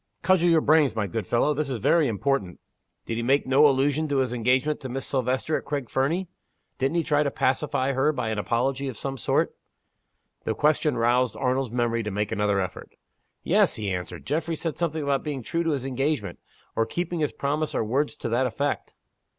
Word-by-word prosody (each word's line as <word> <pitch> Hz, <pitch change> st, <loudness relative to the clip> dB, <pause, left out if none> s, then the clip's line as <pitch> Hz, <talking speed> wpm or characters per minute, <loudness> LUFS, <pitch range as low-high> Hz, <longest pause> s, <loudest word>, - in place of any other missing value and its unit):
"Cudgel 180 Hz, -2 st, +4 dB
your 165 Hz, -2 st, +5 dB
brains, 150 Hz, -5 st, +4 dB
my 110 Hz, -2 st, 0 dB
good 110 Hz, +3 st, -4 dB
fellow! 120 Hz, +5 st, +2 dB
this 150 Hz, 0 st, -2 dB
is 130 Hz, -, -2 dB
very 155 Hz, -, +3 dB
important. 110 Hz, -4 st, -1 dB, 0.5 s
Did 115 Hz, -, -3 dB
he -, -, -1 dB
make 135 Hz, +4 st, +2 dB
no 135 Hz, +3 st, +6 dB
allusion 145 Hz, +3 st, +1 dB
to 145 Hz, -2 st, 0 dB
his 130 Hz, -2 st, +1 dB
engagement 130 Hz, +5 st, +1 dB
to 130 Hz, -, -6 dB
marry 125 Hz, -, -6 dB
Miss 135 Hz, -, -3 dB
Silvester 130 Hz, +3 st, 0 dB
at -, -, -7 dB
Craig 140 Hz, -5 st, -4 dB
Fernie? 165 Hz, +8 st, 0 dB, 0.5 s
Didn't 135 Hz, +4 st, 0 dB
he 170 Hz, -, +2 dB
try 150 Hz, -1 st, +2 dB
to 145 Hz, -, +1 dB
pacify 135 Hz, 0 st, 0 dB
her 135 Hz, +3 st, +2 dB
by 125 Hz, -6 st, -3 dB
an 110 Hz, -1 st, -2 dB
apology 130 Hz, +6 st, 0 dB
of 130 Hz, -5 st, -5 dB
some 135 Hz, +3 st, -4 dB
sort?" 125 Hz, -, 0 dB, 0.9 s
The 110 Hz, -, -1 dB
question 150 Hz, -2 st, +2 dB
roused 120 Hz, +2 st, +2 dB
Arnold's 130 Hz, -1 st, 0 dB
memory 120 Hz, 0 st, 0 dB
to 105 Hz, -, -3 dB
make 105 Hz, +1 st, -2 dB
another 105 Hz, -2 st, +1 dB
effort. 95 Hz, -, -5 dB, 0.5 s
"Yes," -, -, +3 dB
he 105 Hz, -3 st, -3 dB
answered. 90 Hz, -1 st, -5 dB
"Geoffrey 160 Hz, +3 st, -1 dB
said 160 Hz, 0 st, -3 dB
something 160 Hz, -3 st, -2 dB
about 140 Hz, -1 st, 0 dB
being 140 Hz, -4 st, -4 dB
true 165 Hz, +8 st, -1 dB
to 165 Hz, -, 0 dB
his 140 Hz, -4 st, -1 dB
engagement, 135 Hz, -, -2 dB, 0.4 s
or 115 Hz, 0 st, +1 dB
keeping 175 Hz, +5 st, -3 dB
his 150 Hz, -2 st, 0 dB
promise 150 Hz, +2 st, -2 dB
or -, -, +1 dB
words 140 Hz, +7 st, 0 dB
to 120 Hz, -, -4 dB
that 125 Hz, +3 st, +2 dB
effect." 140 Hz, +5 st, -3 dB
135 Hz, 205 wpm, -25 LUFS, 120-150 Hz, 0.9 s, no